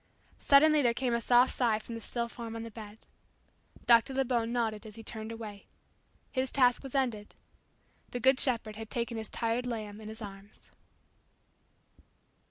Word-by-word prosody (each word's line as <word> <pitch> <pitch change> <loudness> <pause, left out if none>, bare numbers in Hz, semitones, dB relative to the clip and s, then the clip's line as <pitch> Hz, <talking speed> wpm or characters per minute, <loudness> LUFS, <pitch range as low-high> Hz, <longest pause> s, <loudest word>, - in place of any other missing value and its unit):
Suddenly 300 +2 +5
there 240 -3 +2
came 245 -1 0
a 235 - 0
soft 245 +2 +4
sigh 235 -4 +2
from 220 +2 -9
the 230 - -6
still 235 +1 -2
form 230 -1 -7
on 225 - -5
the 230 - -8
bed. 215 -1 -10 0.9
Dr. 235 +3 +5
Lebon 240 -3 0
nodded 220 -3 -1
as 210 - -11
he 225 - -10
turned 220 0 -6
away. 215 -3 -8 0.6
His 260 -1 -1
task 250 -3 +3
was 270 -1 -8
ended. 235 -6 -1 0.7
The 245 - -4
Good 260 +2 +4
Shepherd 225 -5 +2
had 220 -1 -7
taken 235 0 -2
His 220 -1 -1
tired 235 +2 -1
lamb 215 -3 -5
in 215 - -8
His 220 - -8
arms. 200 -1 -11
230 Hz, 170 wpm, -30 LUFS, 220-250 Hz, 0.9 s, Suddenly